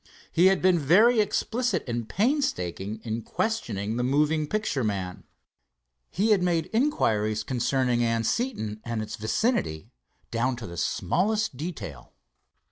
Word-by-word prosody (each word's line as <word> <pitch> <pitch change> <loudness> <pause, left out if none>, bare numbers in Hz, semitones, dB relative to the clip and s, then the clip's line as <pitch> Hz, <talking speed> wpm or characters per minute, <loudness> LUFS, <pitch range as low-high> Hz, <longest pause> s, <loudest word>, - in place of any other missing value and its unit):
He 175 +3 +5
had 190 -1 +2
been 185 -2 +4
very 210 - +5
explicit 220 -1 0
and 120 -2 -3
painstaking 110 - -1
in 115 0 -3
questioning 115 - -2
the 125 - 0
moving 150 +4 +2
picture 210 - -1
man. 95 -4 -3 0.8
He 210 +5 +1
had 200 -3 +4
made 175 -1 0
inquiries 110 - +1
concerning 125 +1 0
Anseton 115 - -1
and 115 -2 -3
its 110 - -6
vicinity 110 - -1 0.4
down 125 +3 0
to 120 -2 -8
the 85 - -8
smallest 210 - 0
detail. 125 - -7
130 Hz, 125 wpm, -26 LUFS, -, 0.8 s, He